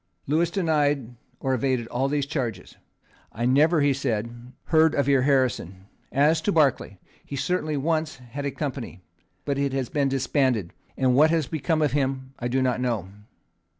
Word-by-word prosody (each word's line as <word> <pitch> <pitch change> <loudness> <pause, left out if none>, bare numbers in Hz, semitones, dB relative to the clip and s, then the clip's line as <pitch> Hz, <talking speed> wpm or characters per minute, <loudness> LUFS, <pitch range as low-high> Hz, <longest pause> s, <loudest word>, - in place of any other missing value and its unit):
Lewis 160 +4 +1
denied 145 - 0 0.3
or 135 -1 -1
evaded 130 -1 0
all 130 +3 0
these 145 0 0
charges. 120 - -4 0.6
"I 120 +2 -3
never," 150 +6 +4
he 140 -1 +3
said, 120 -1 -4
"heard 160 -1 +3
of 140 - +1
your 140 -2 +4
Harrison. 125 - 0 0.3
As 155 +4 +3
to 205 - 0
Barclay, 140 - +1 0.3
he 140 - -7
certainly 155 +1 -1
once 155 +2 -1
had 130 +2 -8
a 140 - -1
company; 130 - -5 0.4
but 140 -1 -1
it 140 -1 0
has 135 -3 -2
been 140 -2 +1
disbanded; 130 - 0 0.2
and 130 -1 +2
what 150 +5 +5
has 160 -2 +1
become 155 +2 -1
of 145 - +1
him 135 -1 -2
I 120 - -2
do 130 +2 +1
not 125 -1 0
know. 115 -7 -2
135 Hz, 170 wpm, -25 LUFS, 125-150 Hz, 0.6 s, what